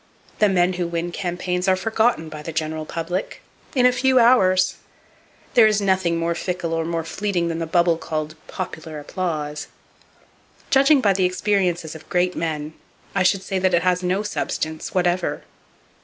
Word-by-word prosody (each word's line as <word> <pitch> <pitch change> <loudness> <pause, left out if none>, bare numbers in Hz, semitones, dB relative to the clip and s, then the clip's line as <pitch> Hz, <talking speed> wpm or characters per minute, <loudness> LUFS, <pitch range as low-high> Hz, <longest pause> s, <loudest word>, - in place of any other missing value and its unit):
The 210 - +5
men 180 -1 +2
who 175 -1 -2
win 170 +1 -3
campaigns 180 0 -2
are 190 - +5
forgotten 220 -3 +1
by 155 -1 -8
the 165 - -6
general 155 0 -3
public, 175 +3 -4 0.3
in 250 -2 +4
a 250 - +7
few 260 +1 +2
hours! 190 -7 +4 0.8
There 230 -2 +7
is 215 -1 +2
nothing 190 -4 +1
more 165 0 0
fickle 175 -1 -3
or 165 0 0
more 165 0 -2
fleeting 175 0 -1
than 165 0 -3
the 165 - -3
bubble 170 0 +2
called 155 -1 -3
"popular 155 -1 -6
applause." 150 -2 -4 1.0
Judging 275 +1 +5
by 200 -4 +4
the 185 -1 +1
experiences 180 -3 0
of 160 - -12
great 180 0 +1
men, 155 -2 -3 0.4
I 195 - +1
should 190 +1 +2
say 190 -1 -2
that 185 -1 +2
it 170 - +1
has 180 0 +2
no 185 +3 0
substance, 160 -6 -3
whatever. 180 0 0
180 Hz, 170 wpm, -22 LUFS, 165-195 Hz, 1.0 s, a